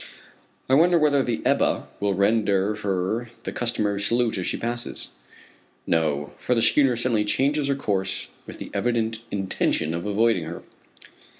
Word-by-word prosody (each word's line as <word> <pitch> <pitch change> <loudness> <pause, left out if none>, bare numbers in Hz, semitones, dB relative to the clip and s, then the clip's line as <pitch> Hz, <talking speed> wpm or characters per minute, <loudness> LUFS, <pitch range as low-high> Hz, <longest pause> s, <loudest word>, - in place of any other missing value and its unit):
I 130 - +1
wonder 170 +5 +5
whether 150 -3 +3
the 120 -4 -2
Ebba - - +2
will 100 -1 0
render 100 0 +2
her 100 +3 -2
the - - -4
customary 105 -4 -1
salute 115 0 +1
as 90 - -3
she - - -1
passes. 120 +1 -4 0.7
No; 75 -3 0
for 125 - 0
the 115 - +2
schooner 135 -5 +4
suddenly 120 -3 +1
changes 140 +7 +1
her 140 - +1
course 95 -7 -2 0.2
with - - -9
the - - -8
evident 115 -2 0
intention 95 -5 0
of 85 +4 -3
avoiding 105 -4 +2
her. 85 +2 -7
110 Hz, 155 wpm, -24 LUFS, 95-120 Hz, 0.7 s, wonder